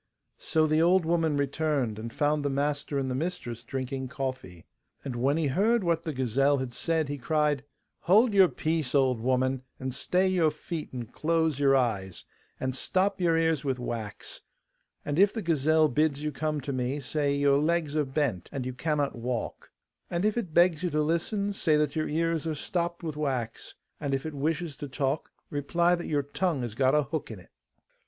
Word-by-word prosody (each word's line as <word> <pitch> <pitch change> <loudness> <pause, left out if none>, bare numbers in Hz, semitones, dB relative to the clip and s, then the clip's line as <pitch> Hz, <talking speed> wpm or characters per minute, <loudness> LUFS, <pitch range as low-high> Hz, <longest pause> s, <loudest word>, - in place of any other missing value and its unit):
So 155 -1 +2
the 155 +1 +2
old 175 +1 +4
woman 165 -3 +1
returned, 140 -5 0
and 115 +1 -6
found 150 +2 +1
the 145 - 0
master 145 +1 -1
and 135 -1 -1
the 130 - -2
mistress 130 -6 -4
drinking 130 +1 -4
coffee. 130 - -5 0.4
And 130 -3 -4
when 135 +5 +1
he 165 - +1
heard 205 - +2
what 170 -2 +1
the 165 - -3
gazelle 135 +2 +2
had 130 -2 -4
said, 160 +1 0
he 145 0 -4
cried: 150 0 +1 0.4
'Hold 215 +5 +4
your 195 -2 +7
peace, 155 -5 -1
old 130 -4 +3
woman, 130 +2 +1 0.2
and 130 -1 -3
stay 180 +8 +1
your 180 -4 +3
feet 155 +1 -6
and 120 -2 -7
close 160 -2 +1
your 135 -1 +4
eyes, 100 -8 -1 0.3
and 130 -1 -2
stop 190 +6 0
your 165 -2 +3
ears 160 -3 +1
with 135 -3 -1
wax; 115 -4 -5 0.6
and 145 +3 -1
if 200 +1 +6
the 225 - -4
gazelle 155 -1 +3
bids 150 +1 +1
you 150 - -1
come 150 +1 -2
to 140 +1 -4
me, 130 +2 -1
say 140 +1 0
your 140 0 +3
legs 155 -1 0
are 155 - +3
bent, 135 - -2
and 135 -3 -4
you 130 - -3
cannot 145 +1 -1
walk; 120 0 -4 0.4
and 175 +3 -1
if 215 - +2
it 220 -9 -3
begs 170 0 +4
you 180 - 0
to 150 -1 +1
listen, 200 +6 0
say 160 -5 +2
your 155 +2 -2
ears 165 +1 0
are 155 - -1
stopped 170 +3 -2
with 155 -3 -4
wax; 130 -6 -3 0.2
and 140 -2 -1
if 135 - -4
it 155 - -4
wishes 155 +2 -2
to 145 - -6
talk, 135 +2 -2 0.2
reply 170 +5 +2
that 175 -1 -2
your 145 -2 +1
tongue 150 -1 -1
has 120 -3 -4
got 130 +3 +3
a 150 - +4
hook 155 0 -4
in 110 - -7
it. 90 - -16
150 Hz, 195 wpm, -28 LUFS, 130-165 Hz, 0.6 s, your